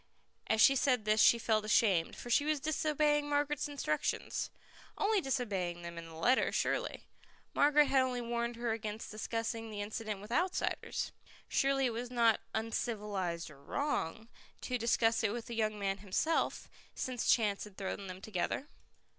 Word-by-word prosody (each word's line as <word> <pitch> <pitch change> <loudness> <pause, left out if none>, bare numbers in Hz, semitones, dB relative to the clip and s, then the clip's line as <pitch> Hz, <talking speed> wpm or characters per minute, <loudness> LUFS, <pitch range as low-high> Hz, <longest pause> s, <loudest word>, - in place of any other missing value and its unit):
As 220 - +2
she 270 - +7
said 255 -5 +2
this 215 0 +4
she 235 - +7
felt 220 -2 +1
ashamed, 200 -5 +3
for 240 - -7
she 285 - +4
was 305 0 +1
disobeying 300 0 +1
Margaret's 290 0 0
instructions. 275 - -2 0.5
Only 415 -1 +2
disobeying 195 - -2
them 170 0 -6
in 165 - -9
the 165 - -11
letter, 245 +11 +3
surely. - - -1 0.5
Margaret 295 +1 +5
had 270 -1 +3
only 255 -1 0
warned 235 0 -2
her 235 0 -2
against 220 0 -4
discussing 225 +1 -3
the 210 -1 -6
incident 215 -1 -4
with 210 +3 -11
outsiders. 355 +8 -1 0.4
Surely 270 0 +2
it 240 - 0
was 240 +2 -4
not 235 -3 +3
"uncivilized 205 -7 -2
or 140 -1 -16
wrong" 225 - -2 0.3
to 250 -1 -2
discuss 230 0 +2
it 215 - +2
with 235 -1 -5
the 235 - -6
young 215 -1 0
man 195 -1 -1
himself, 210 - 0 0.3
since 255 -2 -2
chance 210 -4 +2
had 205 -2 -14
thrown 195 0 -4
them 185 0 -8
together. 220 - -2
225 Hz, 165 wpm, -33 LUFS, 205-265 Hz, 0.5 s, she